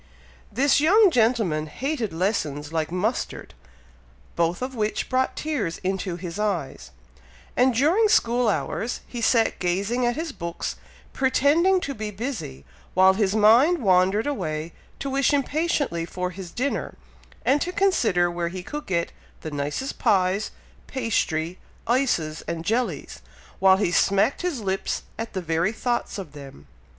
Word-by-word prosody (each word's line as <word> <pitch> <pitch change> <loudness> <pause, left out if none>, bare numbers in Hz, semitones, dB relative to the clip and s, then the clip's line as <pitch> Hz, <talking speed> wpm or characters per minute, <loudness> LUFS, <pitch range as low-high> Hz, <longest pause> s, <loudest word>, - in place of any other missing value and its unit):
This 275 +6 +3
young 385 +6 +5
gentleman 220 - +2
hated 255 - -3
lessons 160 -5 -2
like 160 0 -1
mustard, 205 +7 -2 0.8
both 170 +6 0
of 260 +1 -4
which 215 -3 -2
brought 260 0 +1
tears 270 - -2
into 190 -1 -2
his 175 +1 -6
eyes, 195 -10 -2 0.7
and 255 +1 +4
during 335 - +4
school 240 - +3
hours, 205 - -2
he 240 - -6
sat 225 0 +2
gazing 200 +7 0
at 240 - 0
his 320 0 -3
books, 170 -8 -5 0.4
pretending 300 +8 +3
to 280 - -3
be 215 -3 -5
busy, 200 - -6 0.3
while 190 +1 +6
his 200 0 +1
mind 235 +11 +5
wandered 190 - +3
away 165 - -3 0.2
to - - -5
wish 275 +1 +2
impatiently 285 - 0
for 180 +2 -4
his 185 -1 -8
dinner, 255 +9 -2 0.5
and 280 +2 +3
to 360 - -1
consider 225 - +2
where 170 0 -2
he 185 +1 -7
could 295 +9 -6
get 170 -2 -1 0.3
the 155 - -6
nicest 145 - -3
pies, 190 +1 +2 0.4
pastry, 180 -9 -1 0.3
ices, 230 - 0
and 165 0 -4
jellies, 220 - -2 0.4
while 190 0 +6
he 195 -3 0
smacked 200 +8 +2
his 345 -9 -2
lips 195 -1 -2 0.2
at 225 0 -5
the 190 - -2
very 165 +4 +1
thoughts 240 0 -2
of 185 -7 -7
them. 135 - -11
210 Hz, 145 wpm, -24 LUFS, 175-260 Hz, 0.8 s, while